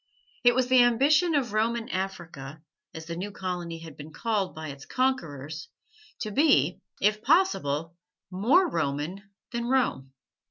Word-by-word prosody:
It 245 -1 +6
was 255 -1 +2
the 255 0 +6
ambition 290 +8 +4
of 250 -7 0
Roman 230 +2 0
Africa, 165 -6 -5 0.3
as 160 0 -8
the 170 0 -5
new 190 +4 -4
colony 180 -4 -4
had 160 -3 -11
been 150 +1 -10
called 205 +2 -1
by 155 -1 -6
its 140 -1 -9
conquerors, 160 - -2 0.5
to 215 - -3
be, 200 - +3 0.2
if 210 +1 +2
possible, 170 - +2 0.4
more 245 - +4
Roman 160 - -2 0.3
than 235 0 -3
Rome. 245 - 0
195 Hz, 145 wpm, -27 LUFS, 160-245 Hz, 0.5 s, It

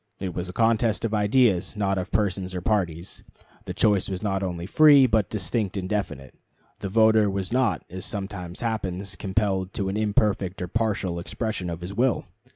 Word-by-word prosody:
It 95 -2 -4
was 90 +1 -4
a - - -4
contest 115 +1 +1
of 110 - -2
ideas, 105 -2 +2
not 100 -2 0
of 90 +3 -5
persons 95 -3 -1
or 90 - -3
parties. 90 -4 -1 0.4
The - - -5
choice 100 -3 +2
was 95 +1 -4
not 95 -2 -1
only 90 -3 -3
free, 145 +4 +6
but 110 -6 +1
distinct 105 0 -2
and 95 -1 -3
definite. 80 -11 -3 0.5
The 100 - -4
voter 110 0 +4
was 95 +2 -3
not, 125 -8 +1
as 95 +1 -7
sometimes 95 -4 -5
happens, 100 -4 -3
compelled 95 -2 -1
to 95 -2 -1
an 100 - -2
imperfect 105 -3 0
or 90 - -3
partial 100 -4 -1
expression 95 0 -4
of 85 0 -5
his 90 +3 -6
will. 125 +4 +1
100 Hz, 180 wpm, -25 LUFS, 90-110 Hz, 0.5 s, free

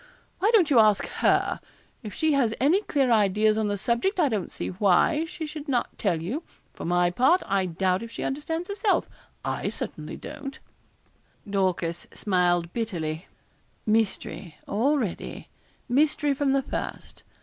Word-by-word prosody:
Why 405 - +3
don't 380 -10 +4
you 250 - +6
ask 215 -2 +4
her? - - +1 0.4
If 215 -4 -7
she 315 +9 +1
has 240 -6 +2
any 315 +10 +4
clear 275 - +1
ideas 215 0 +3
on 220 -1 0
the 205 0 -1
subject 240 - 0
I 305 -5 +4
don't 210 -6 -2
see - - -4
why 205 - +3
she 330 -1 -6
should 300 0 -7
not 255 -4 -1
tell 175 -6 +1
you. 210 - -3 0.3
For - - -7
my 175 +1 +2
part, 260 - +3
I 195 -1 +1
doubt 185 +2 0
if 230 - -7
she - - -6
understands 325 +5 -3
herself 405 0 +1 0.4
I - - -1
certainly - - -6
don't.' 275 -2 -8 0.9
Dorcas 185 -4 -1
smiled 175 -3 +1
bitterly. 170 -8 -3 0.6
'Mystery 215 -5 -1
already 240 - -1 0.4
mystery 290 +2 +2
from 275 0 +1
the 275 -1 +2
first. - - -6
225 Hz, 150 wpm, -26 LUFS, 190-290 Hz, 0.9 s, you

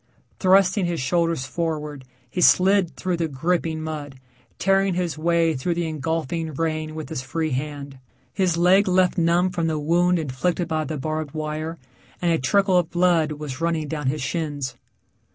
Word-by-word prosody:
Thrusting 190 0 +4
his 170 -1 -2
shoulders 165 +1 0
forward 150 -2 -3 0.2
he 160 +9 -3
slid 190 0 +4
through 180 -2 -2
the 165 -1 0
gripping 160 +2 -1
mud, 145 -4 -6 0.4
tearing 195 -1 +2
his 175 -3 -1
way 165 +1 +2
through 155 +5 -2
the 170 -1 -1
engulfing 160 0 -3
rain 155 0 -2
with 155 -1 -6
his 160 -5 -3
free 155 +4 -2
hand. 140 0 -4 0.3
His 180 -1 +1
leg 185 +4 +4
left 185 -1 +3
numb 170 +2 +2
from 170 -2 -1
the 160 -1 0
wound 175 +4 +2
inflicted 165 +4 -1
by 155 -2 -1
the 155 +2 -4
barbed 155 +1 -4
wire, 155 +1 -4 0.4
and 175 -1 +1
a 165 - +2
trickle 190 +7 +3
of 170 -2 -2
blood 175 -3 +2
was 145 -2 -7
running 165 -2 0
down 150 -2 -3
his 140 +1 -1
shins. 145 -5 -3
160 Hz, 170 wpm, -23 LUFS, 150-175 Hz, 0.4 s, Thrusting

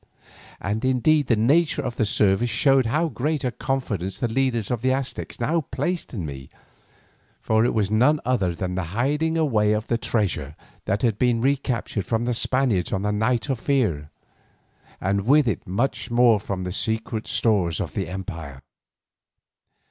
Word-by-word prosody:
And 105 +3 -3
indeed 130 +3 +2
the 115 - +3
nature 145 +11 +2
of 125 -3 -4
the 110 - +2
service 110 0 +2
showed 130 +2 +3
how 155 +8 +1
great 150 +1 -2
a 125 - 0
confidence 105 -9 -3
the 120 - -1
leaders 120 -2 0
of 120 -3 -1
the 130 +1 +2
Aztecs 135 0 -3
now 160 +8 +1
placed 175 +6 -2
in 95 -9 -4
me, 70 -2 -8 0.9
for 110 0 +2
it 120 - +1
was 105 -2 +1
none 130 +8 +4
other 100 -9 +1
than 90 +1 -3
the 90 -1 -2
hiding 150 +6 +1
away 110 -10 +2
of 105 +1 -1
the 115 -1 -1
treasure 85 - -1 0.3
that 100 +1 -1
had 115 -4 +1
been 120 -2 +2
recaptured 125 -7 -1
from 115 0 0
the 125 - 0
Spaniards 120 -6 +1
on 95 -1 -1
the 105 - 0
Night 110 +4 0
of 135 -4 -1
Fear, 105 - 0 0.9
and 100 +2 -1
with 145 0 +5
it 105 - -2
much 115 +11 -1
more 120 -2 +4
from 95 -2 -4
the 90 - -4
secret 110 +2 -2
stores 95 -8 +1
of - - -4
the - - -2
empire. 85 -7 -7
115 Hz, 170 wpm, -24 LUFS, 100-130 Hz, 0.9 s, with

